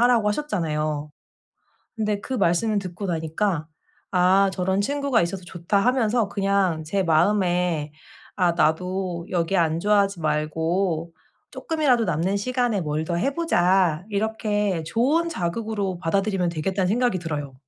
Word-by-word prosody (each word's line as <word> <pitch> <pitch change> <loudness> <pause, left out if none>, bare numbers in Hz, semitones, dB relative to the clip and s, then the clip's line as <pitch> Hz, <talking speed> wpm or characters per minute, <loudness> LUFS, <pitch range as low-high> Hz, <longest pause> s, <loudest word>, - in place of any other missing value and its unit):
하라고 240 -3 +4
하셨잖아요. 155 - -2 0.9
근데 210 -2 -1
그 260 - -5
말씀을 205 +1 +1
듣고 190 +1 -5
나니까 160 0 -1 0.5
'아. 190 +2 +4
저런 190 +1 0
친구가 280 +2 +1
있어서 180 +2 -3
좋다.' 175 +3 -1
하면서 235 -3 +2
그냥 195 -5 0
제 195 +5 0
마음에 175 -2 +1 0.4
'아. 180 -3 +3
나도 175 +2 -1
여기 175 +1 0
안주하지 195 +4 +2
말고 160 +3 -1 0.4
쪼끔이라도 290 -8 +1
남는 175 +2 0
시간에 245 0 0
뭘 155 0 -2
더 170 - -3
해 260 +11 0
보자.' 180 - +2
이렇게 210 -3 -1
'좋은 270 - +1
자극으로 200 - -3
받아들이면 195 +1 0
되겠다.'는 180 +3 -1
생각이 240 -2 +1
들어요. 145 -5 -4
190 Hz, 300 characters per minute, -24 LUFS, 170-210 Hz, 0.9 s, 하라고